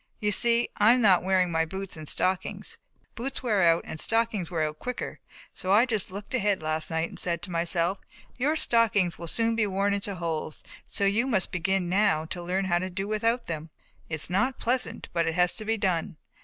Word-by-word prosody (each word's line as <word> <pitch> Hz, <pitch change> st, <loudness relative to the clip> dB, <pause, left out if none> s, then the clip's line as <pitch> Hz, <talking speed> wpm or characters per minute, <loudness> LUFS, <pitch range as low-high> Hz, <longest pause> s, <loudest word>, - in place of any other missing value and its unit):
You 210 Hz, -1 st, 0 dB
see 235 Hz, +3 st, +3 dB
I 215 Hz, +3 st, +6 dB
am 250 Hz, -, +2 dB
not 195 Hz, -5 st, +5 dB
wearing 185 Hz, -1 st, +2 dB
my 165 Hz, 0 st, +2 dB
boots 190 Hz, +3 st, -6 dB
and 155 Hz, -2 st, -5 dB
stockings, 185 Hz, 0 st, -1 dB, 0.3 s
boots 265 Hz, +3 st, -5 dB
wear 215 Hz, -5 st, +2 dB
out 165 Hz, -1 st, +4 dB
and 160 Hz, -, -6 dB
stockings 225 Hz, -5 st, 0 dB
wear 165 Hz, -3 st, -1 dB
out 155 Hz, 0 st, -3 dB
quicker, 250 Hz, 0 st, -5 dB, 0.3 s
so 185 Hz, -, -3 dB
I 215 Hz, +5 st, +6 dB
just 220 Hz, -6 st, +1 dB
looked 200 Hz, +5 st, -8 dB
ahead 205 Hz, -6 st, +1 dB
last 155 Hz, 0 st, -1 dB
night 160 Hz, +1 st, -1 dB
and -, -, -8 dB
said 170 Hz, -1 st, -1 dB
to 185 Hz, -, -6 dB
myself 170 Hz, +2 st, 0 dB, 0.4 s
'your 285 Hz, +5 st, +1 dB
stockings 225 Hz, -, +2 dB
will 170 Hz, -, -6 dB
soon 230 Hz, +5 st, +1 dB
be 220 Hz, -2 st, +1 dB
worn 200 Hz, +1 st, +1 dB
into 200 Hz, 0 st, -2 dB
holes, 165 Hz, -3 st, -4 dB, 0.2 s
so -, -, -1 dB
you 215 Hz, +6 st, +2 dB
must 195 Hz, -8 st, 0 dB
begin 180 Hz, +1 st, 0 dB
now 185 Hz, -4 st, +2 dB
to 175 Hz, +2 st, -5 dB
learn 185 Hz, +3 st, -1 dB
to 175 Hz, +1 st, 0 dB
do 195 Hz, +2 st, -4 dB
without 225 Hz, +3 st, 0 dB
them.' 160 Hz, -1 st, -5 dB, 0.4 s
It's 160 Hz, -2 st, +1 dB
not 245 Hz, +9 st, 0 dB
pleasant, 250 Hz, +2 st, -1 dB
but 170 Hz, -1 st, +1 dB
it 160 Hz, -, -1 dB
has 180 Hz, 0 st, +3 dB
to 215 Hz, -, -5 dB
be 225 Hz, +1 st, 0 dB
done. 185 Hz, -4 st, -1 dB
190 Hz, 210 wpm, -27 LUFS, 170-220 Hz, 0.4 s, I